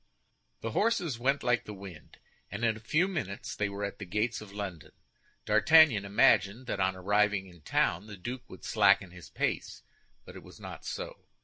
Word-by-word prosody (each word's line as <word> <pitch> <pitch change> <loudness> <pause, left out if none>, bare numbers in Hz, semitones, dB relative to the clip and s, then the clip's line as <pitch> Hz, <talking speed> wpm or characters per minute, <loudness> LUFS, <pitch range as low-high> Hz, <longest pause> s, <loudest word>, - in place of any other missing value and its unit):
The 115 - -3
horses 175 - 0
went 135 +3 +1
like 125 -1 +1
the 105 - -7
wind, 95 -5 -11 0.3
and 100 +4 -2
in 115 -1 +2
a - - -9
few 155 - +1
minutes 145 - -4
they 105 -1 -1
were 100 +1 -5
at 100 - -7
the 100 - -6
gates 105 +6 -1
of 105 -2 -11
London. 100 -6 -7 0.5
D'Artagnan 110 0 +6
imagined 100 +3 +3
that 100 - -3
on 95 0 +1
arriving 100 +1 +1
in 85 -3 -16
town 85 +6 0
the 105 -2 -9
duke 125 +7 -7
would 95 - -12
slacken 90 - +3
his 90 -1 -12
pace, - - -3 0.4
but - - -12
it - - -9
was - - -15
not - - -9
so. - - -6
105 Hz, 190 wpm, -30 LUFS, 95-120 Hz, 0.5 s, D'Artagnan